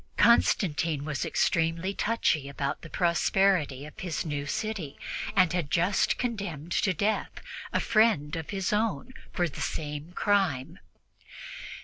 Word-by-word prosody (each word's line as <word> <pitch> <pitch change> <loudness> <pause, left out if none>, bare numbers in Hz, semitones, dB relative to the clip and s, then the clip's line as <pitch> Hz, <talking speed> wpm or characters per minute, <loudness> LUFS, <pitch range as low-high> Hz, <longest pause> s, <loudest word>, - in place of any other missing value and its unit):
Constantine 165 -10 +3
was 150 -4 -2
extremely 165 +4 +1
touchy 180 -11 0
about 140 0 -3
the 165 - -10
prosperity 170 -5 +2
of 150 - -12
his 175 -3 -3
new 145 -2 -3
city 200 -6 -3 0.4
and 185 -3 +4
had 175 -5 -1
just 180 +6 +2
condemned 195 - -4
to 190 - +2
death 205 +5 0 0.4
a - - +1
friend 215 -10 +2
of 160 -2 -5
his 195 0 -1
own 225 +4 -1 0.2
for 175 -1 0
the 145 - -8
same 150 +1 -4
crime. 190 -11 0
170 Hz, 130 wpm, -28 LUFS, 150-200 Hz, 0.4 s, and